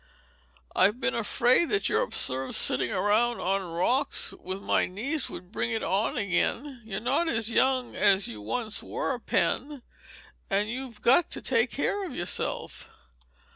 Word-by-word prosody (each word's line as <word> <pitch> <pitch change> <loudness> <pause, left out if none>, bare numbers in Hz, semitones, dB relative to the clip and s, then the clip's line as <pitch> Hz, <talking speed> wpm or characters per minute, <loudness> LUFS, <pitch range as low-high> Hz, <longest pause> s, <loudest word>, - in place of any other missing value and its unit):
I've 205 +6 +4
been - - 0
afraid 240 +7 +2
that 415 -1 +1
your - - +2
absurd 130 - -1
sitting 125 -1 +1
around 230 +4 +1
on 195 +2 0
rocks 190 +11 0
with 185 +1 -5
my - - +1
niece 255 +10 -2
would 180 0 -10
bring 235 - -2
it 225 -2 -2
on 200 +6 0
again. 240 +6 -1
You're 200 -3 -5
not 280 +8 +1
as 230 -4 +1
young 255 +1 +2
as 195 -1 +3
you 110 -2 -7
once 215 - -2
were, 260 -3 -3
Pen, 275 +2 -1 0.7
and 205 +1 +1
you've 250 -3 -7
got 270 +8 +4
to - - -4
take 240 -2 +2
care 400 - -1
of 345 -9 -6
yourself." 175 +1 -3
230 Hz, 155 wpm, -27 LUFS, 195-260 Hz, 0.7 s, I've